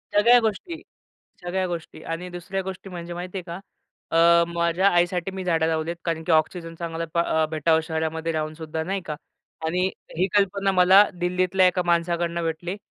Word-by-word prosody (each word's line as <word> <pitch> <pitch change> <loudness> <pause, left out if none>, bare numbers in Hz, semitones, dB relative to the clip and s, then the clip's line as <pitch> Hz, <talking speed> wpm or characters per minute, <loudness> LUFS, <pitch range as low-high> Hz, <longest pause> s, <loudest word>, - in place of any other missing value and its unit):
सगळ्या 235 +4 +7
गोष्टी. 275 - -3 0.6
सगळ्या 185 +1 -1
गोष्टी. 170 -2 -6
आणि 165 +2 -5
दुसऱ्या 175 +2 -4
गोष्टी 190 +1 -7
म्हणजे 175 -1 -7
माहिती 180 +2 -5
आहे - - -5
का? 170 0 -6 0.6
अ, 170 0 +6
माझ्या 170 +3 +2
आईसाठी 175 0 +1
मी 190 -1 -6
झाडं 165 -3 +1
लावली 160 0 -1
आहेत. 170 - -4
कारण 165 -1 -2
की 170 - 0
ऑक्सिजन 165 +1 0
चांगला 165 -1 -4 0.2
अ, 160 -2 +1
भेटावं 160 0 +2
शहरामध्ये 160 +1 -2
राहूनसुद्धा 155 0 -4
नाही 195 +3 -2
का. 150 - -4 0.5
आणि 180 +3 +1 0.3
ही 180 +3 +2
कल्पना 195 0 +2
मला 190 +2 +7 0.2
दिल्लीतल्या 185 +1 +2
एका 180 0 +2
माणसाकडनं 170 0 0
भेटली. 170 +3 -3
175 Hz, 165 wpm, -24 LUFS, 165-185 Hz, 0.6 s, सगळ्या